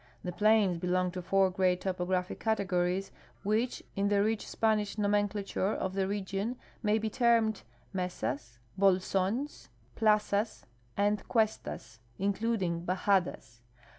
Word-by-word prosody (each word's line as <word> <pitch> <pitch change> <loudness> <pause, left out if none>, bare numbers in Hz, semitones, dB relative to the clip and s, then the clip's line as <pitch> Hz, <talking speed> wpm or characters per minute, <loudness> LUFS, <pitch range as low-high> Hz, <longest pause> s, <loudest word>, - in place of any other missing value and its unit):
The 180 - -3
plains 205 -2 +3
belong 180 +1 +1
to 180 +1 -5
four 190 +1 +3
great 180 -1 +1
topographic 180 -1 -1
categories, 195 -3 0 0.3
which 220 +5 0
in 200 0 +1
the 200 0 +3
rich 220 0 -1
Spanish 215 -2 +1
nomenclature 205 -1 0
of 190 - -2
the 190 -1 0
region 200 +4 -2 0.2
maj' 215 0 +2
be 220 - -1
termed 230 -3 +3 0.3
mesas, 140 -9 -3 0.2
bolsons, 195 - +1 0.3
plazas, 210 0 +1 0.3
and 205 0 +2
cuestas 220 - -1 0.2
(in 200 +1 +1
cluding 190 -6 -1
hajadas). 185 - 0
200 Hz, 120 wpm, -31 LUFS, 185-215 Hz, 0.3 s, plains